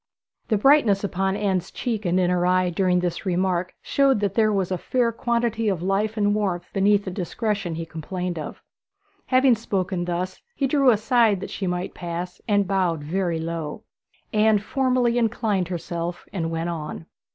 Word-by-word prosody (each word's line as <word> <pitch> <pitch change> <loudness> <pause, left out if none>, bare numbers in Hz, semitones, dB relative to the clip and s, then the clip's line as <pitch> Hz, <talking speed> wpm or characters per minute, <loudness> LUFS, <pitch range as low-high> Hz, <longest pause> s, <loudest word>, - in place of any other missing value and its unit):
"' - - -51
The 215 - +2
brightness 225 -5 +4
upon 195 0 0
Anne's 190 -3 -1
cheek 225 -5 -3
and 180 +1 +2
in 180 -1 +2
her 180 -1 +1
eyes 180 0 +2
during 180 0 +2
this 175 -1 -2
remark 185 -1 0
showed 275 -4 +3
that 200 -2 0
there 215 -1 +3
was 190 -3 0
a 185 - 0
fair 245 +3 +1
quantity 230 -1 0
of 180 -4 -2
life 205 +4 0
and 205 -1 +2
warmth 190 -5 -1
beneath 200 +1 +3
the 190 - -3
discretion 200 -1 -2
he 165 0 -4
complained 175 +2 -4
of. 150 - -7 0.6
Having 255 -2 +4
spoken 190 -5 -2
thus, 180 +1 -3
he 275 - 0
drew 275 -1 +4
aside 225 -2 +3
that - - -6
she 195 - -3
might 180 +1 -2
pass, 175 +1 -5
and 205 -3 +2
bowed 180 -6 0
very 170 +2 -1
low. 165 +3 -4 0.5
Anne 215 0 +4
formally 245 +2 +1
inclined 215 -5 0
herself 175 0 -4
and 165 -4 -2
went 165 +1 -2
on. 160 -1 -5
190 Hz, 175 wpm, -24 LUFS, 175-215 Hz, 0.6 s, brightness